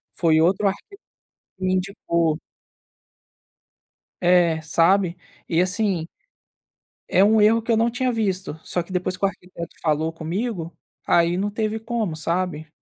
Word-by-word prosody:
foi 160 -2 +3
outro, 190 +5 +3
arqui 195 0 -2 0.8
me 185 0 0
indicou. 170 -4 0 1.8
É, 175 -2 +3
sabe, 170 +3 +2 0.3
e 165 0 +2
assim 185 -3 0 1.0
é 190 - +5
um 215 +2 +5
erro 225 +2 +5
que 230 +1 -2
eu 225 - +3
não 230 +1 +3
tinha 250 +1 0
visto, 190 -8 -2
só 175 - -1
que, 170 - -11
depois 185 0 -1
que 185 - -15
o - - +5
arquiteto 180 -3 -10
falou 155 0 0
comigo, 170 +2 -4 0.3
aí 170 +1 +3
não 205 +2 -1
teve 220 +1 -2
como, 225 -6 -2
sabe? 165 0 -2
185 Hz, 140 wpm, -23 LUFS, 165-210 Hz, 1.8 s, é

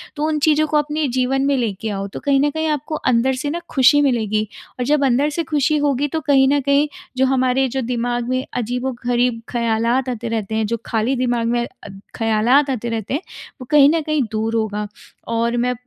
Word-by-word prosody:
तो 295 - -3
उन 310 -1 0
चीज़ों 310 +1 +3
को 305 0 +1
अपने 300 0 0
जीवन 260 +1 0
में 280 0 +2
ले 235 -4 0
के 225 - -2
आओ, 195 -1 -3
तो 195 - -8
कहीं 280 -2 +2
न 290 - +3
कहीं 315 +2 -2
आपको 300 +1 -2
अंदर 255 -2 +1
से 285 +3 -3
ना 335 - -2
ख़ुशी 280 +2 +5
मिलेगी 215 -6 0 0.3
और 250 - -1
जब 290 +1 +2
अंदर 270 +3 +2
से 330 +3 -2
ख़ुशी 305 -1 +1
होगी। 290 -1 +1
तो 320 +3 -2
कहीं 270 -2 +4
न 285 - +3
कहीं 280 +2 +2 0.3
जो 265 - +4
हमारे 260 0 +2
जो 265 +2 -3
दिमाग 240 0 -2
में 255 +1 -1
अजीबो-गरीब 245 0 -1
ख़्यालात 235 +2 0
आते 240 -1 -4
रहते 220 -2 -3
हैं, 220 0 +1
जो 230 +2 -2
खाली 230 +4 0
दिमाग 245 -2 0
में 240 0 +1 0.2
अद 195 -1 -11
ख़्यालात 230 +6 +2
आते 240 -3 -2
रहते 225 0 -3
हैं, 290 - -1 0.4
वो - - -7
कहीं 290 -2 +7
न 325 +1 +1
कहीं 305 -2 0
दूर 220 +1 -1
होगा। 210 -2 -1 0.4
और 230 +1 0
मैं 250 +1 +1
255 Hz, 215 wpm, -20 LUFS, 230-285 Hz, 0.4 s, कहीं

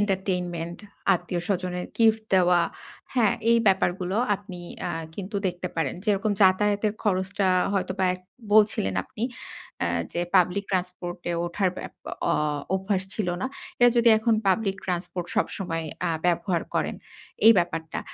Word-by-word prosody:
entertainment, 180 -4 -1 0.4
আত্মীয়-স্বজনের 180 0 -2
gift 220 -1 +4
দেওয়া, 180 -1 +5 0.5
হ্যাঁ? 230 -5 +3 0.2
এই 235 - +6
ব্যাপারগুলো 185 0 +2 0.2
আপনি 190 -3 -10 0.2
অ্যা 175 - -2 0.2
কিন্তু 200 +2 -5
দেখতে 180 0 -3
পারেন। 160 -5 0
যেরকম 210 0 +1
যাতায়াতের 205 +2 +3
খরচটা 190 0 +1 0.2
হয়তোবা 190 -1 0
এক 185 - -11 0.3
বলছিলেন 205 - +4
আপনি 215 - -9 0.6
অ্যা 85 - +1 0.2
যে 170 - -1 0.2
public 185 +3 +3
transport 180 -1 -3
এ - - 0
ওঠার 185 +2 0 0.2
এপ - - -31 0.4
অ - - +3 0.4
অভ্যাস 190 0 0
ছিল 205 -5 -1
না। - - 0 0.3
এরা 245 0 +7
যদি 235 0 +5
এখন 225 0 +2
public 195 0 +1
transport 180 -1 -3
সবসময় 165 -4 -1 0.2
অ্যা - - +1 0.2
ব্যবহার 175 0 +1
করেন, - - 0 0.5
এই 230 - +11
ব্যাপারটা 165 -2 -2
185 Hz, 135 wpm, -26 LUFS, 175-205 Hz, 0.6 s, এই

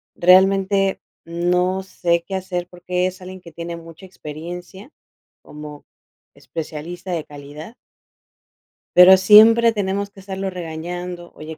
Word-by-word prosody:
Realmente 195 +2 +3 0.2
no 180 +2 -1
sé 170 -2 -1
qué 195 - -4
hacer 180 -2 -4
porque 180 0 -2
es 185 +1 -8
alguien 185 +1 -10
que 170 - -14
tiene 170 0 -6
mucha 165 +2 -13
experiencia 175 - -10 0.5
como 150 -1 -11 0.5
especialista 165 +7 -8
de 165 - -3
calidad 150 - -11 1.2
pero 180 +1 +9
siempre 220 +4 +7
tenemos 200 -1 -3
que - - -16
estarlo 195 0 -5
regañando: 175 +1 -7
"Oye, 155 0 -9
180 Hz, 120 wpm, -20 LUFS, 170-190 Hz, 1.2 s, pero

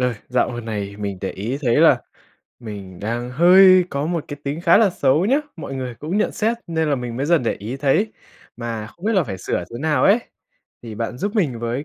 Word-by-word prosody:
ơi 125 -1 +1
dạo 125 -1 +1
gần 120 -1 -6
này 100 -3 -4
mình 100 -2 -4
để 95 - -3
ý 115 +8 -4
thấy 120 -3 +2
là - - +5 0.6
mình 100 -6 -9
đang 120 +3 -3
hơi 185 +5 +7
có 140 +2 -2
một 170 -2 -2
cái 145 - -6
tính 145 +3 -3
khá 170 -1 +5
là 215 -3 +4
xấu 150 0 +2
nhá, 260 +5 +3 0.2
mọi 155 -4 -6
người 130 -2 -4
cũng 155 - -4
nhận 215 - +1
xét 225 +2 0
nên 160 -2 -1
là 145 - +2
mình 120 -2 -5
mới 135 +3 -1
dần 170 -3 +3
để 115 - 0
ý 115 +6 -6
thấy, 145 +11 +1 0.4
mà 115 -2 -5
không 170 - -15
biết 225 - +2
là 190 -6 +3
phải 95 -8 -6
sửa - - -2
thế 120 - -7
nào 155 0 +1
ấy, 200 +4 +5 0.6
thì 115 -3 -8
bạn 115 +2 -4
giúp 205 - -3
mình 150 - 0
với 120 +4 -3
130 Hz, 240 wpm, -21 LUFS, 115-170 Hz, 0.6 s, hơi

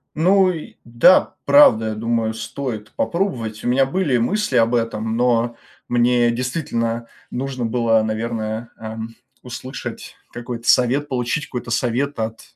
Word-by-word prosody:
Ну 185 +4 +4
и 165 -3 -8
да, 120 +10 +4
правда, 130 -6 +6
я 110 - -4
думаю, 115 0 -1
стоит 110 -2 -5
попробовать. 120 - -2
У - - -2
меня 135 +2 +3
были 150 -6 +1
мысли 140 - 0
об 115 +1 +3
этом, 115 -1 -1
но 120 -1 +1 0.3
мне 120 0 +3
действительно 115 -2 -2 0.2
нужно 130 -1 -3
было, 115 -1 +2
наверное, 110 0 -3
эм, 110 +1 -7 0.3
услышать 130 +1 -7 0.2
какой-то 120 -1 -5
совет, 130 +4 +3
получить 125 +3 -1
какой-то 120 -2 -6
совет 125 +3 -1
от, 110 0 -3
120 Hz, 135 wpm, -20 LUFS, 115-130 Hz, 0.3 s, правда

